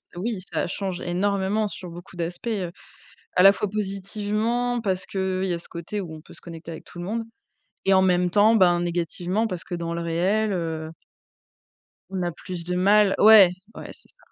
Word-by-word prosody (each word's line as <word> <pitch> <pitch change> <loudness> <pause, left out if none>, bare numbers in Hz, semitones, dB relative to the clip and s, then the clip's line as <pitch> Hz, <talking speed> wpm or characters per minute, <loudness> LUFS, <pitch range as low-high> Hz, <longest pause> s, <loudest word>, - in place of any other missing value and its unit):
oui, 205 +3 -3
ça 160 - 0
change 185 0 -4
énormément 200 +3 0
sur 185 -3 -8
beaucoup 175 +2 -11
d'aspects, 175 +6 -4
heu, 190 -6 -2 0.6
à - - +5
la 195 - +10
fois 210 - -3
positivement 210 +4 -1
parce 190 -4 -1
qu'il 190 -1 -2
y 185 - 0
a 170 - -3
ce - - -13
côté 170 +5 -5
où 170 -4 -7
on 155 - -10
peut - - -16
se - - -15
connecter 165 -1 -9
avec 160 - -8
tout 175 - -12
le 175 - -5
monde 225 +4 -2 0.6
et 195 - +5
en 190 - +5
même 180 -1 +3
temps, 210 +4 +5
ben, 175 -4 +4
négativement 175 +5 -1
parce 180 -5 -5
que, 175 - -5
dans 170 -1 -4
le 170 - -3
réel, 185 +6 0
heu 160 -3 -3 1.2
on 185 -1 -2
a 175 - -2
plus 175 +1 -7
de 180 +1 -2
mal 200 +2 +4
ouais, 210 -4 +8 0.2
ouais, - - -8
c'est - - -17
ça. - - -21
185 Hz, 200 wpm, -24 LUFS, 175-205 Hz, 1.2 s, la